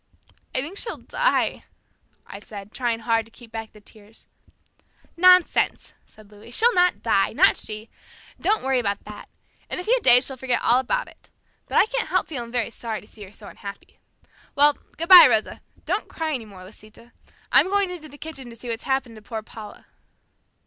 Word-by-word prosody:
"I 255 - +2
think 335 +9 -5
she'll 460 - -4
die," - - -1 0.6
I 200 - -10
said, 205 -1 -11
trying 235 -2 -2
hard 225 0 +1
to 225 - -20
keep 235 -1 -16
back 225 -1 -7
the 210 - -17
tears. 210 +1 -16 0.9
"Nonsense," 365 0 +3
said 215 -1 -19
Louis, 210 +2 -15
"she'll 460 - +3
not 360 0 +2
die! - - +1
Not - - +4
she! 215 +1 -8 0.5
Don't 425 +2 0
worry 265 -1 +1
about 200 -4 -2
that. 210 0 -11 0.4
In - - -3
a - - -5
few - - +2
days 250 - +6
she'll 265 - -6
forget 255 -1 0
all 245 +2 +4
about - - -1
it. - - -19 0.4
But - - -1
I - - +6
can't 470 -4 -3
help 365 +2 +1
feeling 240 -6 -6
very 235 -2 -1
sorry 225 -2 -5
to - - -17
see 220 - -17
her 190 - -16
so 210 0 -13
unhappy. 200 -1 -11 0.6
Well, 290 +1 +5 0.2
good 335 - -3
bye, 365 -2 +11
Rosa. - - -1 0.2
Don't 375 +7 -2
cry 320 -1 -3
anymore, 210 -8 -7
Lisita. 215 +4 -16 0.4
I'm - - +5
going 400 -2 +1
into 320 -4 -9
the 290 - -14
kitchen 275 -5 -9
to 230 - -12
see 240 +1 -10
what's 230 +1 -5
happened 265 -4 -2
to - - -13
poor 220 +1 -7
Paula." 215 -1 -12
245 Hz, 190 wpm, -23 LUFS, 220-325 Hz, 0.9 s, bye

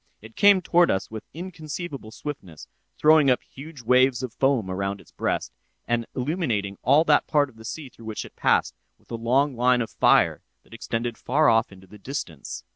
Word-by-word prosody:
It 110 +1 -14
came 200 -2 +5
toward 175 0 +4
us 95 +1 -1
with 110 -1 -8
inconceivable 160 -6 -7
swiftness, 110 - -8 0.3
throwing 155 -2 +5
up 125 - +2
huge 140 -1 -12
waves 125 +1 +3
of 125 -3 -5
foam 135 -7 +1
around 100 +1 -3
its - - -19
breast, - - -2 0.3
and 120 -1 -1
illuminating 125 - -2
all 140 +6 +4
that 150 -3 +3
part 145 -2 +2
of 125 - -21
the 110 0 -13
sea 150 +5 -6
through 115 - -16
which 110 -1 -5
it - - -14
passed, - - +2 0.2
with - - -24
a - - -2
long 130 +5 +1
line 125 +1 +3
of 115 - -3
fire - - +3 0.2
that - - -19
extended 115 0 -4
far 150 +4 +2
off 115 -1 +2
into 95 0 -15
the 105 +3 -15
distance. 95 - -6
125 Hz, 195 wpm, -24 LUFS, 110-150 Hz, 0.3 s, came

